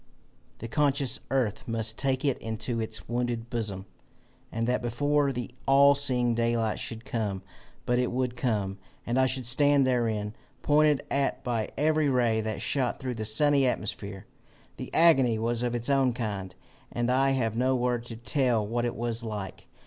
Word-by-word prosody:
The 115 - -7
conscious 140 0 +1
earth 125 -6 -1
must 115 -1 +2
take 135 0 0
it 140 - +1
into 110 +1 -3
its 110 -1 -3
wounded 120 0 -3
bosom, 105 -5 -3 0.7
and 115 0 -2
that 125 +1 0
before 145 +4 +1
the 125 0 -5 0.2
all 140 +1 +6
seeing 125 -4 +1
daylight 115 -1 0
should 115 0 -5
come. 100 -5 -3 0.4
But 125 0 +1
it 125 - 0
would 125 0 -1
come, 105 -6 -2 0.3
and 120 +2 0
I 130 - +4
should 130 -1 0
stand 140 +3 +4
therein 110 -5 0 0.3
pointed 150 -1 +3
at 140 0 0
by 115 -3 -2
every 155 +1 +2
ray 120 -4 +2
that 110 -1 -4
shot 130 -4 0
through 130 -2 -3
the 110 -2 -5
sunny 140 +5 +3
atmosphere! 100 -4 -4 0.5
"The - - -7
agony 135 -9 +4
was 115 +1 -1
of 120 -1 -1
its 120 0 -1
own 135 -3 +3
kind, 100 -6 -4 0.4
and 120 +1 -1
I 135 +2 +3
have 115 -3 -1
no 130 +2 +1
word 125 -1 0
to 115 - -6
tell 120 -2 0
what 120 +3 -1
it 120 - -2
was 120 0 -2
like. 105 -4 -6
120 Hz, 170 wpm, -27 LUFS, 110-130 Hz, 0.7 s, all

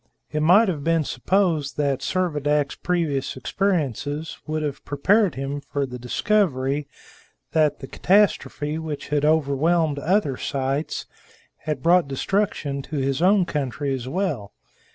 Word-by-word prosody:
It 150 - -1
might 185 +8 +6
have 155 -7 -2
been 165 0 +2
supposed 165 -5 0
that 140 -3 +1
Servadac's 150 -2 0
previous 160 -8 -1
experiences 155 - -2
would 155 0 -2
have 145 -2 -4
prepared 190 - +2
him 135 +2 -4
for 140 -1 0
the 125 -1 -8
discovery 140 - 0 0.6
that 155 -2 +2
the 135 - -7
catastrophe 160 -5 +1
which 155 -3 -5
had 150 0 +1
overwhelmed 155 +1 +2
other 155 -4 +1
sites 135 +2 -2 0.6
had 150 -4 -3
brought 175 -1 +4
destruction 140 -1 -1
to 150 - -8
his 135 +2 0
own 190 +1 +4
country 140 -3 -2
as 130 -2 -4
well. 145 - -2
150 Hz, 135 wpm, -23 LUFS, 140-175 Hz, 0.6 s, might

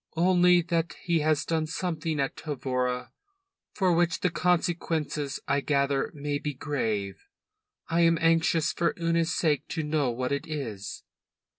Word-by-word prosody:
"Only 180 0 +5
that 165 -1 -1
he 170 -2 +2
has 155 -1 +1
done 160 -1 0
something 160 -2 -2
at 135 -1 -1
Tavora 125 -4 -2 0.6
for 185 -3 +2
which 170 0 +1
the 180 - +1
consequences, 165 -4 0
I 140 0 +2
gather, 140 -1 +1
may 145 0 -2
be 145 -1 -4
grave. 110 -9 -2 0.7
I 170 +1 +1
am 165 0 +4
anxious 165 -1 +2
for 170 - 0
Una's 165 0 +1
sake 150 -6 +1
to 160 - -3
know 150 -3 +1
what 125 +2 -2
it 140 +4 -2
is." 115 - -5
155 Hz, 145 wpm, -27 LUFS, 140-165 Hz, 0.7 s, Only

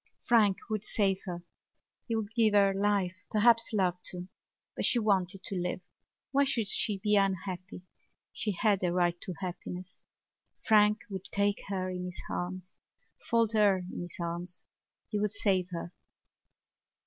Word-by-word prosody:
Frank 215 -5 +5
would 215 -2 -2
save 195 -3 +1
her. 175 -2 -5 0.6
He 230 - -1
would 220 -1 -3
give 220 -3 +4
her 200 -1 +5
life, 195 -2 0
perhaps 230 +2 +4
love, 180 -4 +1
too. 180 0 -6 0.5
But - - -2
she - - +5
wanted 195 -3 +1
to 195 - -4
live. 180 0 -2 0.5
Why 280 +1 +4
should 240 -5 0
she 205 +1 0
be 210 +2 +2
unhappy? 190 -1 -1 0.5
She 210 - -1
had 200 0 +2
a 175 - +2
right 175 -1 +1
to 185 - -5
happiness. 180 0 -6 0.6
Frank 210 0 +5
would 190 -1 -5
take 200 0 0
her 190 -2 -2
in 180 0 -4
his 180 -1 -7
arms, 185 +1 -4 0.5
fold 230 -2 +3
her 200 -4 +3
in - - -4
his 175 0 -8
arms. 175 +1 -5 0.5
He 210 - -1
would 210 0 +1
save 195 -3 +1
her. 170 -1 -6
195 Hz, 155 wpm, -30 LUFS, 180-210 Hz, 0.6 s, Frank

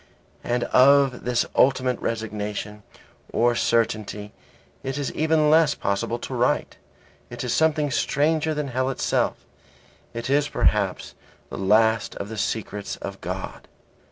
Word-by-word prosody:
And 120 0 0
of 135 -1 +4
this 120 -1 +1
ultimate 130 -1 +3
resignation 105 -1 -4 0.5
or 120 +1 +2
certainty 110 -3 -1 0.5
it 135 +1 -4
is 140 -2 -3
even 155 -1 +2
less 160 -2 +4
possible 100 +4 -2
to - - -7
write; - - 0 0.5
it 120 0 -6
is 125 - -1
something 155 -2 +2
stranger 155 +3 +1
than 150 -2 -3
hell 130 +1 -1
itself; 135 - 0 0.8
it 115 0 -4
is 145 +2 +2
perhaps 100 -3 0 0.4
the - - -5
last 110 +3 +2
of 100 - -6
the 110 - -6
secrets 105 -1 -3
of - - -8
God. - - -6
120 Hz, 130 wpm, -24 LUFS, 110-140 Hz, 0.8 s, of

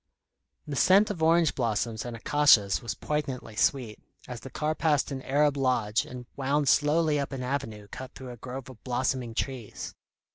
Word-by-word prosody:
The 145 - -5
scent 195 +8 +5
of 175 -6 -6
orange 165 -1 +4
blossoms 115 -2 -1
and 120 -1 -5
acacias 115 -7 +4
was 115 -3 -4
poignantly 140 -7 -3
sweet, 120 -1 0 0.3
as 125 -2 -6
the 135 - -9
car 150 +4 -1
passed 150 -3 +1
an 135 -1 -4
Arab 145 +2 +2
lodge, 120 -5 +1
and 125 -1 -8
wound 140 +1 0
slowly 150 0 +3
up 140 - -3
an 135 -2 -4
avenue 115 -6 -4
cut 130 +6 -9
through 130 -2 -8
a 120 - -10
grove 130 +2 -7
of 130 -4 -13
blossoming 125 -2 -1
trees. 130 -4 -4
130 Hz, 175 wpm, -28 LUFS, 120-150 Hz, 0.3 s, scent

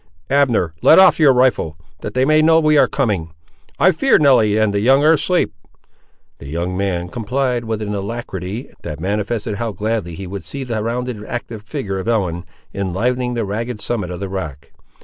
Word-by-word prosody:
Abner, 125 - +2
let - - +7
off 190 -2 +6
your 150 -3 +6
rifle, 125 -11 +1 0.2
that 105 - -7
they 130 +1 +3
may 155 +2 +4
know 160 +1 +5
we 155 -1 +3
ar' 145 - +5
coming. 95 - -2 0.4
I 185 - +5
fear 270 +11 +3
Nelly 125 -8 +4
and 110 -2 +2
the 100 - +1
young 135 +6 +4
ar' 155 +2 +6
asleep." 175 +3 +1 0.9
The 70 - -10
young 85 +4 -3
man 90 -3 -1
complied 120 +4 -2
with 110 -1 -3
an 105 0 -3
alacrity 100 +2 -5
that 75 - -6
manifested 105 +3 -2
how 115 -1 -3
gladly 105 -5 -3
he 95 - -7
would 95 +2 -6
see 140 -1 -6
the 115 -4 -3
rounded, 120 -1 -3
active 120 -2 -6
figure 100 -2 -4
of 95 - -6
Ellen, 90 -7 -1 0.3
enlivening 120 +6 -1
the 115 -2 -1
ragged 110 +3 -4
summit 105 -5 -3
of 90 -1 -6
the 100 - -4
rock. 75 -8 -6
110 Hz, 190 wpm, -19 LUFS, 95-125 Hz, 0.9 s, let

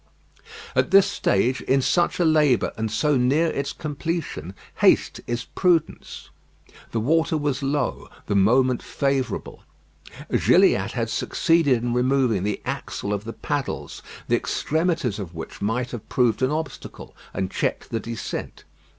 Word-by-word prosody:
At - - +2
this 195 0 +7
stage, 125 +7 +1
in 135 - +2
such 175 +5 +1
a 175 - +3
labour 150 -5 +3
and 110 0 -2
so 150 +4 +1
near 140 +7 +2
its 140 -2 -2
completion, 150 - -4 0.2
haste - - +3
is 120 +1 -3
prudence. 175 -4 -1 0.6
The 115 - -2
water 160 +7 +2
was 145 -2 -1
low; 140 +1 -2 0.2
the - - -2
moment 125 +5 +3
favourable. 135 -2 -2 0.7
Gilliatt - - +3
had - - -2
succeeded 145 -8 +2
in 120 -1 -1
removing 125 -4 +2
the 105 +1 -3
axle 100 - -3
of 105 +1 -4
the 115 - -5
paddles, 145 -2 -4 0.3
the - - +3
extremities 160 - -1
of 90 -4 -7
which 80 - -8
might 115 +5 -1
have 120 -4 -8
proved 125 -1 +2
an 130 - +3
obstacle 155 +1 -6 0.2
and 95 -1 -3
checked - - -2
the 115 - -1
descent. 115 0 -6
130 Hz, 140 wpm, -23 LUFS, 115-155 Hz, 0.7 s, this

